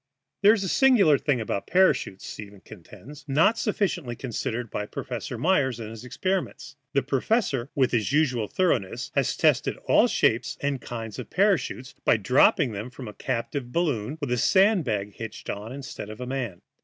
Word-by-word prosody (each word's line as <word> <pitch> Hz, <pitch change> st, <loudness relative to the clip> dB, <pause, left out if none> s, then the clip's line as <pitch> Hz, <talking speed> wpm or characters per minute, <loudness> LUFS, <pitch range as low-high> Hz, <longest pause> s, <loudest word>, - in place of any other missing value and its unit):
There 205 Hz, +2 st, +7 dB
is 210 Hz, -3 st, -1 dB
a -, -, -2 dB
singular 200 Hz, -, +5 dB
thing 140 Hz, -5 st, 0 dB
about 105 Hz, -3 st, -3 dB
parachutes, 185 Hz, -, +2 dB
Stevens 100 Hz, -3 st, -9 dB
contends, 145 Hz, +3 st, -13 dB
not 165 Hz, +11 st, +3 dB
sufficiently 180 Hz, -, -1 dB
considered 120 Hz, -1 st, -4 dB
by 105 Hz, -, -3 dB
Professor 120 Hz, +1 st, -5 dB
Myers 130 Hz, -4 st, +1 dB
in 110 Hz, -1 st, -6 dB
his 115 Hz, +1 st, -9 dB
experiments. 180 Hz, -1 st, -3 dB, 0.2 s
The 140 Hz, -2 st, +2 dB
professor, 140 Hz, -, 0 dB
with 130 Hz, -3 st, +2 dB
his 115 Hz, -1 st, 0 dB
usual 130 Hz, -7 st, +1 dB
thoroughness, 130 Hz, -, -1 dB
has -, -, 0 dB
tested -, -, +2 dB
all -, -, +5 dB
shapes -, -, +1 dB
and 140 Hz, -2 st, -2 dB
kinds 115 Hz, -1 st, -6 dB
of 120 Hz, -, -7 dB
parachutes 185 Hz, -10 st, 0 dB
by -, -, +4 dB
dropping 125 Hz, +4 st, +3 dB
them 105 Hz, +3 st, -5 dB
from 125 Hz, -1 st, -9 dB
a 105 Hz, -, -8 dB
captive 120 Hz, +3 st, -3 dB
balloon 145 Hz, -5 st, -1 dB
with 145 Hz, -5 st, -3 dB
a 125 Hz, -, +1 dB
sand 195 Hz, -, +4 dB
bag 105 Hz, -3 st, -2 dB
hitched 115 Hz, -1 st, -6 dB
on 105 Hz, +3 st, -7 dB
instead 130 Hz, -5 st, -7 dB
of 110 Hz, +1 st, -9 dB
a 125 Hz, -, -4 dB
man. 125 Hz, -8 st, -4 dB
130 Hz, 175 wpm, -26 LUFS, 115-160 Hz, 0.2 s, There